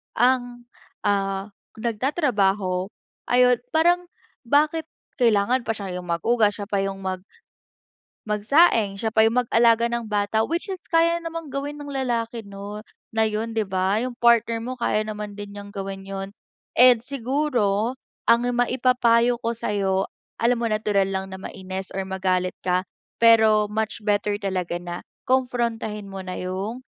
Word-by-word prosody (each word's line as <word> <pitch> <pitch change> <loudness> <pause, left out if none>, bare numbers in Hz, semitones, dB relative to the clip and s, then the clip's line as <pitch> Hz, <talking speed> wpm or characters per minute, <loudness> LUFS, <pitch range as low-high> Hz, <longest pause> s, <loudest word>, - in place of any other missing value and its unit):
ang 245 0 +1 0.4
ah, 195 0 0 0.3
nagtatrabaho, 210 - 0 0.5
ayun 250 0 +5 0.2
parang 350 +3 +3 0.4
bakit 305 +4 +2 0.4
kailangan 230 +2 +3
pa 225 - 0
siya 190 -3 -5
yung 180 - -12
maghugas, 210 +5 +2
siya 205 - -3
pa 200 -1 +1
yung 195 0 -3
mag 185 -1 -2 1.1
magsaing, 215 - +3
siya 220 +2 -2
pa 220 - +5
yung 245 +2 +2
mag-alaga 230 0 +4
ng 235 -2 -3
bata? 205 +1 +1
Which 340 +5 -2
is 370 - -6
kaya 335 0 +3
namang 330 -4 -6
gawin 285 +1 -4
ng 290 0 -7
lalaki 235 -3 -2
'no, 200 +1 -7 0.3
na 220 0 +3
yun 220 +2 -3
'di 220 - +2
ba? 190 +2 +1
Yung 250 -1 -4
partner 230 -1 +3
mo, 255 +1 -4
kaya 215 -2 +1
naman 210 -1 -6
din 205 0 -7
niyang 205 0 -8
gawin 195 0 -5
yun. 195 0 -5 0.4
And 245 -2 +7
siguro 250 -5 0 0.4
ang 235 +1 +5
maipapayo 245 -1 +3
ko 230 0 0
sa'yo, 195 -4 -1 0.3
alam 240 +2 +3
mo - - -1
natural 210 -3 +1
lang 190 0 -3
na 190 - -5
mainis 190 0 -6
or 195 - -2
magalit 185 -1 0
ka, 180 0 +2 0.4
pero 220 -2 +5
much 220 +1 -2
better 205 0 +1
talaga 185 -4 -2
na 175 0 -7 0.2
konprontahin 235 -5 -1
mo 195 -1 -7
na 185 - -5
yung 195 +7 -4
220 Hz, 150 wpm, -24 LUFS, 195-245 Hz, 1.1 s, And